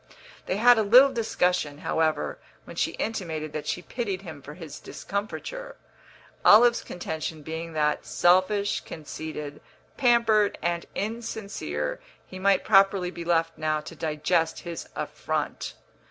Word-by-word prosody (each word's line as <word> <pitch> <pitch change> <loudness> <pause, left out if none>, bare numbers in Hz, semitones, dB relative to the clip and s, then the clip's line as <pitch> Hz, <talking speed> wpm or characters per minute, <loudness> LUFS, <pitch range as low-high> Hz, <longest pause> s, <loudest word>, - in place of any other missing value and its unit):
They 185 - 0
had 240 +1 +6
a - - +4
little 250 +6 +7
discussion, 180 - 0
however, 160 -1 0 0.2
when - - -11
she - - 0
intimated 160 -8 -3
that 155 - -5
she 180 - -2
pitied 200 -5 -3
him 160 -6 -9
for 145 +2 -10
his 165 -4 -9
discomfiture, - - -5 0.7
Olive's 235 +3 +7
contention 160 -3 -5
being 160 +2 -5
that, 150 -1 +1
selfish, 185 +3 +3
conceited, 150 -1 -7 0.4
pampered 235 -5 +3
and 170 0 -1
insincere, 200 - -3 0.3
he 185 - -9
might 195 0 +3
properly 195 -3 +4
be 170 - -7
left 165 -1 +1
now 155 0 0
to 165 - -10
digest 160 +1 0
his 170 -2 -7
affront. - - -3
180 Hz, 130 wpm, -26 LUFS, 155-210 Hz, 0.7 s, little